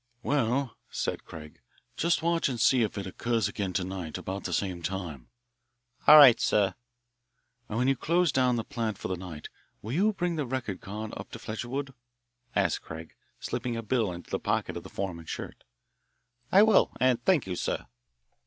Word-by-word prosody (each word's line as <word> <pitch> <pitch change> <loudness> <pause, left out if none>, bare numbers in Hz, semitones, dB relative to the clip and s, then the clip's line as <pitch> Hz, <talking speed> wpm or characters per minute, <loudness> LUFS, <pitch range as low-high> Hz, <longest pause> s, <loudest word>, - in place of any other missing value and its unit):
"Well," 135 -2 0
said - - -3
Craig, 75 -1 -11 0.4
"just 165 0 +1
watch 170 -3 +2
and 125 -3 -3
see 125 +2 +4
if 110 -2 -1
it 100 - -3
occurs 115 +2 0
again 100 -2 -3
to 90 - 0
night 90 -4 -5
about 95 +1 -5
the - - -2
same 90 -3 -1
time." 85 -7 -5 0.8
"All 155 - +11
right, 130 -6 +9
sir." 100 -2 +2 1.0
"And 110 - -3
when 125 +2 +2
you 135 - +4
close 170 +4 +2
down 125 -2 +3
the 115 - -1
plant 115 -6 -3
for - - -5
the 95 - 0
night, 85 -4 -8 0.3
will 110 - -5
you 205 +7 +3
bring 175 -3 -1
the 150 - -1
record 120 -7 -3
card 110 +1 -6
up - - -8
to - - -5
Fletcherwood?" 135 +5 -4 0.6
asked - - +1
Craig, 80 0 -9 0.3
slipping 120 -2 -3
a 115 - -4
bill 110 -3 +1
into 85 0 -9
the - - 0
pocket - - -1
of - - -4
the - - -11
foreman's 85 -4 -5
shirt. - - -6 0.9
"I 195 +2 +8
will, 220 -2 +5
and 125 -2 +2
thank 185 -7 +3
you, 95 -1 -3
sir." - - -2
115 Hz, 185 wpm, -28 LUFS, 95-135 Hz, 1.0 s, All